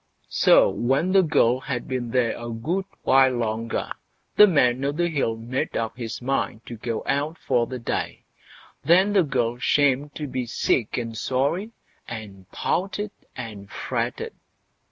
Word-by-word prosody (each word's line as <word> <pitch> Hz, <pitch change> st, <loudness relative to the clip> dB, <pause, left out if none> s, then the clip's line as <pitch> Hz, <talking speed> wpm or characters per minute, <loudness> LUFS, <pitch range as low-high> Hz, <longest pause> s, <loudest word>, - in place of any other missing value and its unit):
So -, -, +5 dB
when 135 Hz, +9 st, +1 dB
the 195 Hz, 0 st, +6 dB
girl 130 Hz, -7 st, +3 dB
had 130 Hz, -3 st, -4 dB
been 125 Hz, -2 st, -3 dB
there 120 Hz, -1 st, +1 dB
a 120 Hz, 0 st, -6 dB
good 160 Hz, +12 st, -2 dB, 0.2 s
while 130 Hz, 0 st, +5 dB
longer, 115 Hz, -1 st, -2 dB, 0.4 s
the 210 Hz, -, +9 dB
Man 130 Hz, -7 st, +3 dB
o' 140 Hz, -, +1 dB
the 170 Hz, +4 st, 0 dB
Hill 135 Hz, -8 st, -1 dB
made 120 Hz, +4 st, -3 dB
up 115 Hz, 0 st, -2 dB
his 120 Hz, 0 st, -6 dB
mind 125 Hz, -3 st, -1 dB
to 120 Hz, -, -7 dB
go 115 Hz, 0 st, -4 dB
out 145 Hz, +4 st, -1 dB
for 120 Hz, -3 st, +1 dB
the 130 Hz, -, -5 dB
day; 120 Hz, -, -3 dB, 0.6 s
then 190 Hz, +5 st, +4 dB
the 195 Hz, -, +5 dB
girl 125 Hz, -6 st, -1 dB
shammed 145 Hz, +1 st, +2 dB
to 150 Hz, -, -4 dB
be 130 Hz, -3 st, -3 dB
sick 115 Hz, -1 st, 0 dB
and 115 Hz, -2 st, -3 dB
sorry, 140 Hz, -, 0 dB, 0.4 s
and 100 Hz, -4 st, -8 dB
pouted 200 Hz, +3 st, -2 dB, 0.2 s
and 105 Hz, -5 st, -8 dB
fretted. -, -, -3 dB
130 Hz, 155 wpm, -24 LUFS, 115-145 Hz, 0.6 s, the